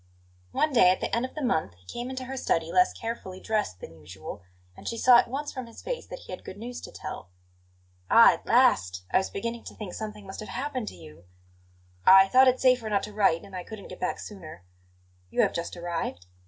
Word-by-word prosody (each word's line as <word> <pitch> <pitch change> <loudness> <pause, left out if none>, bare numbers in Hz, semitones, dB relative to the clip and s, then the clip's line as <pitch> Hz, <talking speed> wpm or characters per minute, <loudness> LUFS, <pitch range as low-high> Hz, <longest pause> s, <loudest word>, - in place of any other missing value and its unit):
One 305 - +1
day 230 -7 +7
at 185 - +2
the - - -1
end 235 +2 0
of 260 - -10
the 305 - -4
month 160 - 0
he 90 +1 -26
came 240 - -5
into 260 0 -5
her 265 +1 -6
study 165 -10 0
less 180 0 +4
carefully 210 -5 -6
dressed 210 - -2
than - - -9
usual, 75 - -9 0.3
and - - -11
she 230 - -3
saw 245 0 +7
at - - +1
once 280 +4 -4
from 255 -3 -6
his 230 - -13
face - - -4
that - - -8
he - - -12
had - - -7
good 185 - -9
news 240 +3 -7
to - - -9
tell. 95 - -8 0.8
"Ah, - - +8
at - - -9
last! 90 0 +3
I - - +5
was 190 - -3
beginning 230 +3 -4
to - - -9
think 200 -5 -7
something 210 -2 -7
must 190 - -8
have 215 - -7
happened 260 -4 -3
to - - -6
you!" 85 0 -14 0.8
"I 190 0 +8
thought 260 +3 +6
it 255 0 +3
safer 250 -4 +3
not 205 -1 +1
to 210 - -7
write, 195 -5 +2
and 200 -2 -11
I 180 - -4
couldn't 215 -1 -10
get 185 - -9
back 180 - -1
sooner." 170 - -10 0.7
"You - - +2
have - - +1
just 170 +1 -4
arrived?" 170 - -4
210 Hz, 235 wpm, -27 LUFS, 175-245 Hz, 0.8 s, Ah